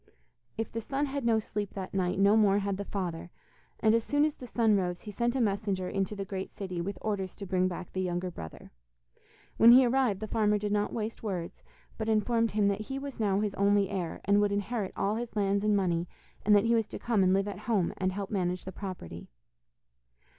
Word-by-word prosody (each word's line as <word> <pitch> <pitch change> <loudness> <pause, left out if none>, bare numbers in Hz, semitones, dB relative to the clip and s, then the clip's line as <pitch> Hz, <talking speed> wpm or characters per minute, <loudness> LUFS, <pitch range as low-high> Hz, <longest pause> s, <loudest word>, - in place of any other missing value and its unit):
If 225 - -3
the 230 - -3
son 275 +5 -1
had 280 -1 -3
no 230 -1 +3
sleep 210 -2 -4
that 190 -1 -5
night, 185 -2 0
no 200 +2 +5
more 205 -3 +4
had 200 -1 -1
the 200 - -4
father, 175 -4 -4 0.5
and 220 0 +4
as 230 0 +2
soon 290 +3 +2
as 305 - 0
the 250 - -10
sun 225 -3 +3
rose, 180 -2 -1
he 210 - -8
sent 235 +4 0
a - - +1
messenger 200 -4 0
into 195 +2 -2
the 200 -1 -4
great 190 0 -5
city 185 -3 -4
with 195 +2 -4
orders 195 -4 -2
to 200 - -7
bring 185 -1 +1
back 180 0 -6
the 185 - -1
younger 180 0 -2
brother. 80 - -10 0.9
When 235 +1 +9
he 255 +1 +8
arrived 245 -5 +2
the 215 - -4
farmer 210 -1 +2
did 205 0 -3
not 210 0 +1
waste 220 0 -4
words, 180 -6 -4 0.4
but 220 0 -1
informed 230 +1 +2
him 210 -1 +3
that 200 +1 0
he 270 +5 -5
was 275 -2 -7
now 200 -2 +2
his 210 -2 -1
only 200 0 +2
heir, 175 -4 -3
and 200 +1 +4
would 205 0 +2
inherit 205 0 -2
all 205 +2 0
his 235 -1 -5
lands 200 -1 +1
and 210 -1 +3
money, 175 -3 0 0.4
and 210 0 +5
that 205 - +4
he 230 - +3
was 225 -2 +2
to - - -7
come 230 -4 +1
and 185 -1 +4
live 195 +1 +2
at 200 -2 -5
home, 200 -7 +2
and 185 - 0
to 185 - -5
help 200 -1 -4
manage 180 -3 -1
the 190 - -5
property. 175 - -7
205 Hz, 230 wpm, -30 LUFS, 190-220 Hz, 0.9 s, When